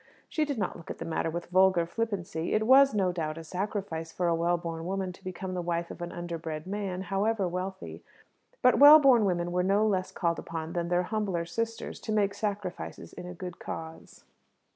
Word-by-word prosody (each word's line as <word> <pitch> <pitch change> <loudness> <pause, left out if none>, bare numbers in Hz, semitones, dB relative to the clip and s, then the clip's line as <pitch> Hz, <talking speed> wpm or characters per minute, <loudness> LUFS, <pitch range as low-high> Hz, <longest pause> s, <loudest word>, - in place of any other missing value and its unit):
She 310 - 0
did 285 -3 -3
not 200 -4 -2
look 170 - -12
at - - -5
the 165 - -6
matter 165 0 -1
with 170 +2 -5
vulgar 185 -2 +4
flippancy. 195 -4 -3
It 215 0 +2
was, 270 0 +6
no 190 -3 +2
doubt, 160 -3 -3
a 165 - -7
sacrifice 180 -2 -4
for 175 +1 -1
a 170 - +3
well 170 +1 +1
born 165 -1 -5
woman 190 -1 -2
to 190 - -18
become 185 0 -5
the 180 - -2
wife 170 0 -2
of - - -9
an 175 - -4
underbred 165 -3 -5
man, 190 -1 -3
however 195 +1 0
wealthy. 185 +2 -5 0.6
But 250 - +5
well 290 +2 +11
born 260 -7 +5
women 175 -2 0
were 180 +1 +1
no 200 +3 +3
less 190 -3 0
called 170 -1 -1
upon 165 0 -5
than 170 -1 -1
their 175 +1 +2
humbler 195 -4 -2
sisters 225 +6 -4
to 220 - -5
make 205 -2 +2
sacrifices 200 -3 -5
in 180 -1 -8
a 180 - -7
good 180 0 -7
cause. 160 0 -8
180 Hz, 205 wpm, -29 LUFS, 170-205 Hz, 0.6 s, well